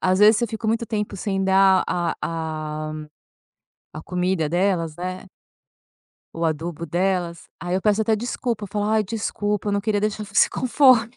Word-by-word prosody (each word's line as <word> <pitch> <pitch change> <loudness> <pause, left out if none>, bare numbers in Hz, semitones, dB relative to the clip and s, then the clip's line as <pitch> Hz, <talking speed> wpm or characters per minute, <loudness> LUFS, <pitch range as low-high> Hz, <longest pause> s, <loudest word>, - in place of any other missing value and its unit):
às 185 0 +2
vezes, 210 +1 +7
se 235 - +1
eu - - -4
fico 220 0 -5
muito 230 +1 0
tempo 210 -2 -3
sem 195 0 -1
dar 190 0 +5
a 175 -1 -1
a 155 -1 -4 1.0
a 155 - -8
comida 180 -2 0
delas, 175 -2 0
né 185 +1 -5 1.1
o 165 0 -3
adubo 165 +1 -2
delas, 175 0 -1
aí 175 +2 -2
eu 190 - +1
peço 210 0 +3
até 220 0 +2
desculpa, 235 -2 -3
falo: 205 +1 -2
"Ai, 220 0 +2
desculpa, 205 -1 -2
eu - - 0
não 200 - +1
queria 205 0 0
deixar 210 0 -1
você 195 0 +3
com 255 - -3
fome". 245 -3 +4
195 Hz, 175 wpm, -23 LUFS, 175-215 Hz, 1.1 s, vezes